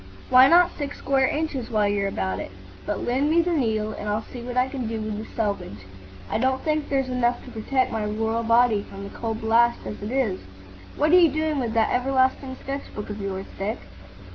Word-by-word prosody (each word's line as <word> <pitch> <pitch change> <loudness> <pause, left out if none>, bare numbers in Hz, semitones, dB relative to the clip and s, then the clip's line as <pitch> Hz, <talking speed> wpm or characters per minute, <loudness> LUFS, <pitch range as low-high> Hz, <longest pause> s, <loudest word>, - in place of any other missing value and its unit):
"Why 255 +1 +8
not 350 +3 +6
six 285 -2 -5
square 270 -1 +2
acres, 295 -6 -3
while 215 -2 +2
you're 200 -1 0
about 95 - -2
it? - - -5 0.4
But 205 - -2
lend 265 +5 +1
me 335 +2 +4
the 355 - -1
needle, 220 -7 0
and 210 0 -5
I'll 210 +1 -1
see 245 - -9
what 245 +1 -5
I 250 +1 +3
can 260 -3 -4
do 225 0 -3
with 215 -1 -4
the 220 - -6
selvage. 200 - -3 0.4
I - - -1
don't 260 +2 +1
think 305 -1 -1
there's 270 -2 +1
enough 250 -1 0
to 255 - -10
protect 255 +3 0
my 220 -2 -2
royal 220 +2 -1
body 230 -2 +3
from 195 0 -8
the 200 - -8
cold 225 -1 -4
blast 235 +2 +3
as 210 - -6
it 205 - -4
is. 245 -7 0 0.6
What 300 +2 +2
are 360 - +8
you 335 -2 +6
doing 310 0 -1
with 235 -3 -2
that 225 -1 +2
everlasting 260 +1 +1
sketch 275 +1 -5
book 210 0 -5
of 205 0 -6
yours, 195 -1 -4
Dick?" 205 +3 -2
235 Hz, 220 wpm, -24 LUFS, 215-270 Hz, 0.6 s, Why